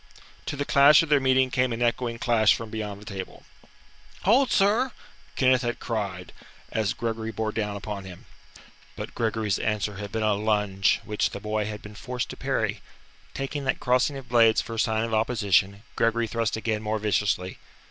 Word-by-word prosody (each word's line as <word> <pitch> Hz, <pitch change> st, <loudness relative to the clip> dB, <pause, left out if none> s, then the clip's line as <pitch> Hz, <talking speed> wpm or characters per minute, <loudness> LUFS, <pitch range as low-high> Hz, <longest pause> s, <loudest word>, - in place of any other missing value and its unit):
To -, -, -2 dB
the 145 Hz, 0 st, -2 dB
clash 140 Hz, +3 st, +6 dB
of 165 Hz, -, -6 dB
their 145 Hz, -1 st, +5 dB
meeting 130 Hz, -1 st, +3 dB
came 130 Hz, -1 st, +1 dB
an 115 Hz, +1 st, -1 dB
echoing 120 Hz, 0 st, 0 dB
clash 115 Hz, -3 st, +3 dB
from 115 Hz, -2 st, -7 dB
beyond 105 Hz, -2 st, -5 dB
the 105 Hz, -, -14 dB
table. 95 Hz, -3 st, -7 dB, 0.8 s
"Hold, 245 Hz, +6 st, +4 dB
sir!" 220 Hz, +6 st, +2 dB, 0.4 s
Kenneth 130 Hz, -1 st, +3 dB
had 120 Hz, -1 st, -2 dB
cried, 100 Hz, -6 st, -4 dB, 0.4 s
as 110 Hz, -2 st, 0 dB
Gregory 115 Hz, -1 st, -3 dB
bore 110 Hz, 0 st, -2 dB
down 105 Hz, -2 st, -2 dB
upon 100 Hz, 0 st, -5 dB
him. 90 Hz, -2 st, -11 dB, 0.7 s
But -, -, -7 dB
Gregory's 110 Hz, -3 st, -1 dB
answer 105 Hz, -2 st, -1 dB
had 100 Hz, 0 st, -6 dB
been 110 Hz, -1 st, -2 dB
a 105 Hz, -1 st, +3 dB
lunge 105 Hz, -2 st, +1 dB
which 105 Hz, -1 st, 0 dB
the -, -, -7 dB
boy 105 Hz, +1 st, -2 dB
had 105 Hz, -1 st, -7 dB
been 105 Hz, -, -10 dB
forced 125 Hz, +4 st, -4 dB
to -, -, -6 dB
parry. -, -, -2 dB, 0.5 s
Taking 140 Hz, +1 st, -3 dB
that 130 Hz, -, 0 dB
crossing 130 Hz, +3 st, +1 dB
of 135 Hz, -2 st, -10 dB
blades 115 Hz, -2 st, +5 dB
for 115 Hz, -, -4 dB
a 115 Hz, -, -4 dB
sign 110 Hz, -1 st, +1 dB
of 115 Hz, -1 st, -3 dB
opposition, 105 Hz, -3 st, +1 dB
Gregory 115 Hz, 0 st, +1 dB
thrust 115 Hz, 0 st, -1 dB
again 110 Hz, -1 st, -2 dB
more 110 Hz, 0 st, -1 dB
viciously. 100 Hz, -3 st, -1 dB
110 Hz, 185 wpm, -26 LUFS, 105-125 Hz, 0.8 s, clash